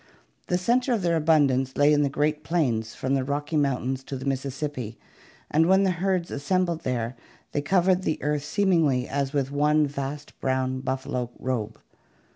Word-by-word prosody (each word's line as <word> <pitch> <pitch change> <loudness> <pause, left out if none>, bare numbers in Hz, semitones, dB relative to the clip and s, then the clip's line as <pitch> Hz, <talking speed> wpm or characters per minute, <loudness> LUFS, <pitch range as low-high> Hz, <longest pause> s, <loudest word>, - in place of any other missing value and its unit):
The 180 - +1
center 245 +7 +2
of 215 -5 -1
their 170 -1 +2
abundance 145 -5 +2
lay 145 +1 +5
in 145 - +3
the 140 - +2
great 150 +2 0
plains 120 -10 0
from 130 +1 -2
the 135 -1 +1
Rocky 145 +3 -2
Moun 140 -4 +1
tains 130 0 -7
to 135 - -4
the 130 - -7
Mississippi, 135 -3 -3 0.5
and 160 +2 +4
when 190 +1 +5
the 190 - +3
herds 180 0 -1
assembled 170 +3 0
there 120 -1 -2 0.4
they 145 - -1
covered 185 +4 +3
the 155 -4 -1
earth 150 -1 0
seemingly 160 -9 +2
as 140 -1 -1
with 140 -2 -1
one 150 +1 +3
vast 140 +1 -6
brown 130 0 0
buffalo 130 -2 -3
robe. 115 -4 -3
145 Hz, 175 wpm, -26 LUFS, 130-165 Hz, 0.5 s, lay